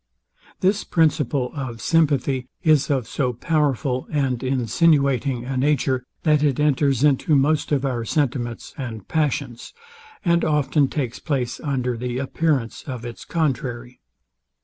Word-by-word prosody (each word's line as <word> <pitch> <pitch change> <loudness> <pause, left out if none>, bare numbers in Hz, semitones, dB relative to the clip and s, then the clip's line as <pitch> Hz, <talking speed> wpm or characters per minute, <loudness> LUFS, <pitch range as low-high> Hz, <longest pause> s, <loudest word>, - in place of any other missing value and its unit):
This 200 +3 +2
principle 145 -5 +1
of 130 -6 -5
sympathy 140 -5 +1 0.2
is 155 -4 +3
of 130 -6 0
so 125 -4 -1
powerful 140 -2 0
and 135 -5 0
insinuating 135 0 +1
a 135 +1 -3
nature, 130 -2 +1 0.2
that 150 -2 +3
it 145 -3 +1
enters 140 -3 +2
into 150 +1 +3
most 145 +3 +2
of 140 -2 +1
our 125 -4 -1
sentiments 120 -2 -2
and 115 -6 -6
passions, 145 - -2 0.5
and 170 -1 +3
often 150 -1 +2
takes 130 -4 -3
place 130 -6 -2
under 125 -4 -2
the 125 +1 -3
appearance 135 -2 -1
of 125 -3 -5
its 120 -1 -8
contrary. 125 -6 -2
135 Hz, 130 wpm, -22 LUFS, 125-150 Hz, 0.5 s, is